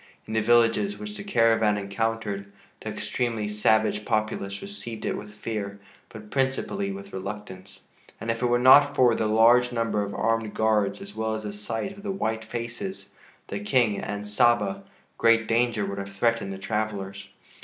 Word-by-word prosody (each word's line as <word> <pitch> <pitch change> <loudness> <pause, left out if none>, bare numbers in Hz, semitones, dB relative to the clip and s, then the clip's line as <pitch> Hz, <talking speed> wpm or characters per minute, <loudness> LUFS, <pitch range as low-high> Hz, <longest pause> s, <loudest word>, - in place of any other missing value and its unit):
In 110 - -7
the 110 - +2
villages 120 - +3
which 210 0 -7
the 200 - -6
caravan 115 - +3
encountered, 100 0 -3 0.3
the - - -6
extremely 115 -4 -2
savage 105 0 +2
populace 105 -2 -2
received 120 - -7
it - - -1
with 105 0 -8
fear, 105 -2 -4 0.3
but 105 -2 -11
principally 140 +9 -1
with 200 0 -9
reluctance, 95 -1 -7 0.4
and 115 - -1
if 115 +1 -4
it 125 - +2
were 120 0 +3
not 140 +3 +7
for 125 -2 +5
the 110 -1 0
large 120 +3 +5
number 115 -3 0
of 100 0 -4
armed 115 -1 0
guards 110 - +1
as 200 +1 -11
well 110 0 -1
as 110 - -5
the 105 -1 -5
sight 115 - -4
of 200 - -12
the 205 - -5
white 110 - -2
faces, 120 - -6 0.4
the - - -3
King, 125 - +2
and 105 +1 -5
Saba, 105 -2 +2 0.4
great 115 -1 +4
danger 115 -2 +1
would 100 0 -4
have 100 0 -7
threatened 115 -1 +1
the 95 - -5
travelers. 100 -1 -3
110 Hz, 175 wpm, -26 LUFS, 105-120 Hz, 0.4 s, not